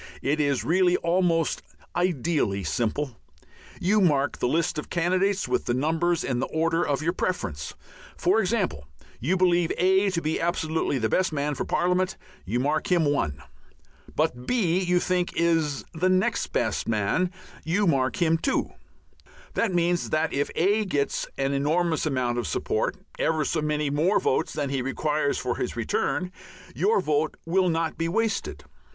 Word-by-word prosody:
It 150 Hz, +3 st, +1 dB
is 140 Hz, -3 st, +1 dB
really 180 Hz, +2 st, +3 dB
almost 170 Hz, -2 st, +1 dB, 0.3 s
ideally 160 Hz, -, 0 dB
simple. 120 Hz, -, -2 dB, 0.6 s
You 205 Hz, +4 st, +2 dB
mark 145 Hz, -6 st, +2 dB
the -, -, +1 dB
list 160 Hz, +2 st, 0 dB
of -, -, -8 dB
candidates 185 Hz, +3 st, +1 dB
with -, -, -1 dB
numbers 160 Hz, +7 st, +1 dB
in 125 Hz, -2 st, -1 dB
the 130 Hz, -, -1 dB
order 165 Hz, +1 st, 0 dB
of 145 Hz, +1 st, -1 dB
your 170 Hz, +2 st, +1 dB
preference. 95 Hz, -, -3 dB, 0.4 s
For 190 Hz, +5 st, +3 dB
example, 185 Hz, -, -1 dB, 0.3 s
you 170 Hz, +10 st, +1 dB
believe 175 Hz, -2 st, +3 dB
A 190 Hz, +2 st, +3 dB
to 185 Hz, -3 st, -1 dB
be 155 Hz, -1 st, -2 dB
absolutely 160 Hz, -4 st, 0 dB
the 110 Hz, -3 st, +1 dB
best 185 Hz, +10 st, +1 dB
man 145 Hz, 0 st, -1 dB
for 135 Hz, -, -3 dB
parliament; 180 Hz, +1 st, +1 dB, 0.3 s
you 115 Hz, +6 st, -1 dB
mark 155 Hz, +9 st, 0 dB
him 170 Hz, -3 st, +4 dB
1. 145 Hz, -, -1 dB, 0.7 s
But 125 Hz, -5 st, -1 dB
B 185 Hz, -8 st, +2 dB
you 180 Hz, -1 st, +2 dB
think 180 Hz, 0 st, 0 dB
is 165 Hz, -4 st, +1 dB
the 180 Hz, +3 st, +1 dB
next 200 Hz, +4 st, +1 dB
best -, -, -1 dB
man; 115 Hz, -, +1 dB, 0.3 s
you 185 Hz, +6 st, +1 dB
mark 135 Hz, -6 st, +1 dB
him 165 Hz, -2 st, +3 dB
2. 270 Hz, -, 0 dB, 0.8 s
That 230 Hz, -, +1 dB
means 175 Hz, 0 st, +1 dB
that 155 Hz, +1 st, 0 dB
if 140 Hz, +1 st, 0 dB
A 205 Hz, +5 st, +2 dB
gets 145 Hz, -8 st, -1 dB
an 135 Hz, 0 st, 0 dB
enormous 160 Hz, +3 st, +1 dB
amount 125 Hz, -4 st, 0 dB
of 120 Hz, -, -3 dB
support, -, -, -1 dB, 0.2 s
ever 155 Hz, -2 st, +1 dB
so 160 Hz, -, 0 dB
many 150 Hz, -1 st, 0 dB
more 165 Hz, +8 st, +2 dB
votes -, -, 0 dB
than 140 Hz, -2 st, -2 dB
he 135 Hz, -2 st, 0 dB
requires 145 Hz, +3 st, 0 dB
for -, -, -2 dB
his -, -, -3 dB
return, 180 Hz, 0 st, -1 dB, 0.4 s
your 200 Hz, +3 st, +2 dB
vote 155 Hz, -2 st, 0 dB
will 180 Hz, +2 st, +2 dB
not 165 Hz, -1 st, -1 dB
be 165 Hz, 0 st, 0 dB
wasted. 205 Hz, -, -1 dB
165 Hz, 160 wpm, -26 LUFS, 140-180 Hz, 0.8 s, him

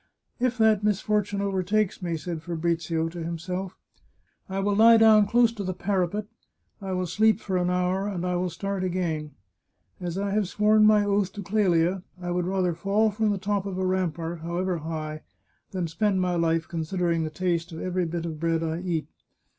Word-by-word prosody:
" -, -, -47 dB
If 250 Hz, 0 st, -4 dB
that 220 Hz, -2 st, +4 dB
misfortune 210 Hz, -1 st, 0 dB
overtakes 200 Hz, +1 st, 0 dB
me," 170 Hz, -2 st, -2 dB
said 160 Hz, +1 st, -5 dB
Fabrizio 165 Hz, -1 st, -1 dB
to 170 Hz, 0 st, -6 dB
himself, 180 Hz, +3 st, -4 dB, 0.4 s
" -, -, -43 dB, 0.3 s
I 190 Hz, -, -3 dB
will 200 Hz, +1 st, +1 dB
lie 230 Hz, +2 st, +7 dB
down 215 Hz, -2 st, +6 dB
close 235 Hz, +1 st, +4 dB
to 220 Hz, -3 st, -6 dB
the 185 Hz, -1 st, -3 dB
parapet; 195 Hz, +2 st, -1 dB, 0.6 s
I 195 Hz, -1 st, -4 dB
will 185 Hz, 0 st, -1 dB
sleep 215 Hz, +4 st, +3 dB
for 190 Hz, -, -3 dB
an 180 Hz, 0 st, +1 dB
hour, 180 Hz, +2 st, 0 dB
and 180 Hz, -3 st, -3 dB
I 180 Hz, 0 st, 0 dB
will 180 Hz, +1 st, -1 dB
start 195 Hz, +3 st, -3 dB
again. 170 Hz, -4 st, -2 dB, 0.7 s
As 175 Hz, -1 st, -4 dB
I 200 Hz, 0 st, -1 dB
have 205 Hz, -1 st, +1 dB
sworn 215 Hz, +2 st, +4 dB
my 210 Hz, -1 st, +5 dB
oath 200 Hz, -2 st, +1 dB
to 205 Hz, -, -6 dB
Clelia, 185 Hz, -3 st, +2 dB, 0.2 s
I 175 Hz, -1 st, -4 dB
would 175 Hz, 0 st, -1 dB
rather 185 Hz, -2 st, +1 dB
fall 200 Hz, +6 st, +1 dB
from 215 Hz, +1 st, 0 dB
the 205 Hz, -, 0 dB
top 200 Hz, 0 st, -1 dB
of 190 Hz, -2 st, -4 dB
a 190 Hz, -, 0 dB
rampart, 175 Hz, -3 st, -1 dB
however 175 Hz, +2 st, -2 dB
high, 155 Hz, -1 st, -5 dB, 0.5 s
than 185 Hz, -3 st, -2 dB
spend 195 Hz, +3 st, 0 dB
my 180 Hz, -1 st, +1 dB
life 165 Hz, -1 st, +1 dB
considering 170 Hz, 0 st, -1 dB
the 155 Hz, -, -2 dB
taste 170 Hz, +1 st, -1 dB
of 160 Hz, -, -7 dB
every 185 Hz, -1 st, -1 dB
bit 170 Hz, 0 st, -3 dB
of 160 Hz, -2 st, -5 dB
bread 165 Hz, 0 st, 0 dB
I 160 Hz, 0 st, -2 dB
eat. 170 Hz, -4 st, -2 dB
185 Hz, 195 wpm, -26 LUFS, 170-200 Hz, 0.7 s, lie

